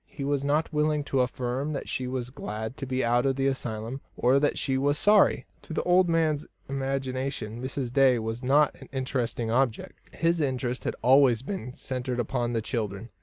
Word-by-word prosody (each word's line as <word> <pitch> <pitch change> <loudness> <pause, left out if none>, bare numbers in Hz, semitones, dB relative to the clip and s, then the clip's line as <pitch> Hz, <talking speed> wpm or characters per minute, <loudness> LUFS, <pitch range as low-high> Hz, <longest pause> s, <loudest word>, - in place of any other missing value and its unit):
He 140 - -7
was 140 0 0
not 150 +3 0
willing 150 0 +1
to 135 -2 +1
affirm 125 +3 -2
that 140 - -4
she 130 - -3
was 125 -1 -4
glad 110 -1 -5
to 135 - -5
be 130 0 0
out 120 +1 +3
of 135 - +1
the 135 0 0
asylum, 120 -1 -3 0.2
or 130 +3 +4
that 145 0 +1
she 135 -2 0
was 145 +2 +1
sorry. 205 +3 +4 0.2
To - - -8
the - - -1
old 180 0 +4
man's 160 -3 +1 0.2
imagination 135 -4 -3
Mrs. 130 -1 -4
Day 135 -2 +5
was 115 +1 -4
not 140 +3 +4
an - - -12
interesting 125 -4 -2
object; 120 -2 0
his 165 0 +1
interest 130 -3 -2
had - - -1
always 130 -2 +5
been 140 -7 -5
centred 125 -1 -4
upon 120 0 -1
the 115 -2 -1
children. 110 -2 -3
130 Hz, 190 wpm, -27 LUFS, 120-140 Hz, 0.2 s, Day